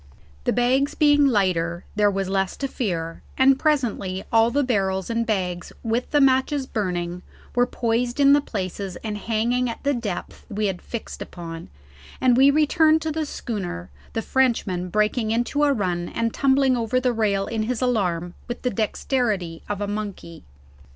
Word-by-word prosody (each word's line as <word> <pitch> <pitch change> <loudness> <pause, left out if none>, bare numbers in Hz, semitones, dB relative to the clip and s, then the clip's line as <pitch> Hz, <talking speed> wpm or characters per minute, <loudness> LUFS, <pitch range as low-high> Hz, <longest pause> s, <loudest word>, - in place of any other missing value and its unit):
The - - +3
bags 260 +3 +2
being 290 -1 +5
lighter 180 -7 +1
there 210 0 +4
was 195 -1 -2
less 195 0 -1
to 275 - -2
fear, 170 -10 -3 0.2
and 265 0 +5
presently 225 -11 0
all 225 0 +5
the 285 +4 +1
barrels 195 -5 0
and 230 0 0
bags 180 -5 -2
with 235 +2 -1
the 295 - +3
matches 270 +1 +3
burning 180 -6 -3 0.3
were 245 0 +3
poised 240 +1 -1
in 280 0 +7
the 290 - +5
places 195 -5 -4
and 215 -2 -3
hanging 230 +4 0
at 230 - -7
the 285 0 +2
depth 220 -8 -5
we 210 0 -1
had 190 -3 -2
fixed 235 - -7
upon, 165 -2 -8 0.5
and 255 -2 +4
we 270 +3 +6
then 280 - +2
returned 310 +1 +4
to 315 - -1
the 310 0 -2
schooner, 180 - -5 0.2
the 225 - -2
Frenchman 215 -9 +1
breaking 215 +3 +1
into 240 +6 0
a 285 - +3
run 180 -8 -1
and 230 -1 -1
tumbling 270 -1 +3
over 235 +1 0
the 250 -1 +1
rail 205 -3 +1
in 225 -1 -2
his 230 +1 -1
alarm 180 -8 0
with 240 - -6
the 250 - +1
dexterity 210 -5 -1
of 205 -1 -3
a 205 - -1
monkey. 200 -5 -6
225 Hz, 175 wpm, -23 LUFS, 190-255 Hz, 0.5 s, in